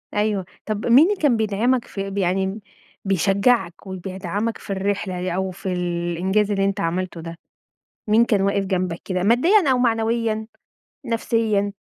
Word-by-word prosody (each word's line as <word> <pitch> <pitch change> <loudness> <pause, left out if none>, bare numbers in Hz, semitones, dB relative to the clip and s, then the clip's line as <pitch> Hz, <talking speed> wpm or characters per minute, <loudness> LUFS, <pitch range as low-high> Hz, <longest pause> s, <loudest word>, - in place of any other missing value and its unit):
أيوه. 210 -2 0 0.2
طَب 215 -1 -3
مين 255 +6 +7
اللي 415 - +1
كان 270 -6 +3
بيدعَمك 220 +4 +1
في 195 0 -5
ب 195 - -7
يعني 190 0 +1
م 195 +3 -5 0.5
بيشجّعك 195 +1 +1
وبيدعَمك 190 +3 -4
في - - -15
الرحلة 195 0 -2
يع 180 0 -3
أو 190 0 -1
في 185 +1 -4
الإنجاز 180 +3 0
اللي 195 -1 +1
أنت 195 0 -1
عملته 175 0 -2
ده؟ 165 0 -8 0.7
مين 220 +2 +5
كان 210 -4 +2
واقف 200 0 +1
جنبك 185 -3 -2
كده 185 -2 -1
ماديًا 280 - +4
أو 255 - +3
معنويًا، 225 -2 0 0.6
نفسيًا؟ 225 -4 0
200 Hz, 155 wpm, -22 LUFS, 185-225 Hz, 0.7 s, مين